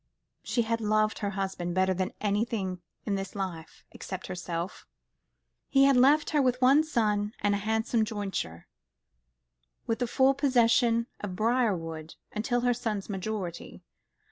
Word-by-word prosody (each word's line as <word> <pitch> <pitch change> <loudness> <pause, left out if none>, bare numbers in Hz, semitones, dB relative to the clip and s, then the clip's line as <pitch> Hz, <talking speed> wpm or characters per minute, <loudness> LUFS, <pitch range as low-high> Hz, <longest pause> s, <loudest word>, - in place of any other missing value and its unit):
She 235 - 0
had 230 0 -1
loved 215 0 +1
her 205 - -1
husband 190 -3 -3
better 190 0 +3
than 185 +1 -2
anything 205 -3 -1 0.2
in 205 - -1
this 195 0 -4
life, 180 -5 -6
except 185 -1 -7
herself. 175 0 -5 0.8
He 275 0 +5
left 280 +4 +4
her 300 -2 +3
with 250 -1 +1
one 270 +4 +5
son 210 -8 0
and 205 0 +1
a 200 - 0
handsome 220 +2 +1
jointure, 195 - -4 1.2
with 225 - -1
the 245 - 0
full 265 +3 +4
possession 240 -4 +3
of 195 -3 -5
Briarwood 180 -9 -1 0.2
until 240 +3 0
her 245 0 +3
son's 220 -4 -3
majority. 190 -3 -5
215 Hz, 140 wpm, -28 LUFS, 190-240 Hz, 1.2 s, He